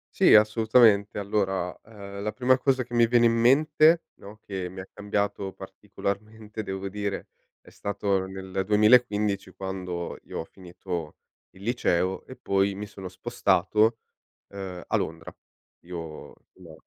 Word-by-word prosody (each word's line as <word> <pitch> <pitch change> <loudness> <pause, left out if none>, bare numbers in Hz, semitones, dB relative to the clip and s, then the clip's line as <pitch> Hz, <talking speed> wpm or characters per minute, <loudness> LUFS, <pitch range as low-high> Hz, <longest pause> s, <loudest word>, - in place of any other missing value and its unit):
Sì, - - +6
assolutamente. 110 -1 +5
Allora, 95 -3 -1
ehm, 100 -2 -9
la 105 0 -2
prima 130 +2 +3
cosa 130 -1 +2
che 120 0 -9
mi 120 -1 +5
viene 120 0 +4
in 115 - +4
mente, 150 +7 +4
no, 105 +2 -13
che 95 -3 -5
mi 95 0 -8
ha 95 - -9
cambiato 100 -1 -2
particolarmente, 110 +4 -6
devo 95 0 -4
dire, 100 0 -4 0.3
è - - -21
stato 100 -1 -1
nel 95 0 -4
2015 105 -2 +3
quando 90 -2 -5
io - - -7
ho - - -5
finito 90 -3 -7 0.3
il 95 - -17
liceo 95 -5 0
e 130 - -10
poi 100 0 +1
mi 105 +2 -6
sono 95 -2 -9
spostato, 105 +1 +1 0.5
ehm, 95 -3 -7
a - - +1
Londra. 80 +1 -4 0.5
Io, 90 0 -8 0.6
no, 85 -4 -14
100 Hz, 140 wpm, -26 LUFS, 95-110 Hz, 0.6 s, Sì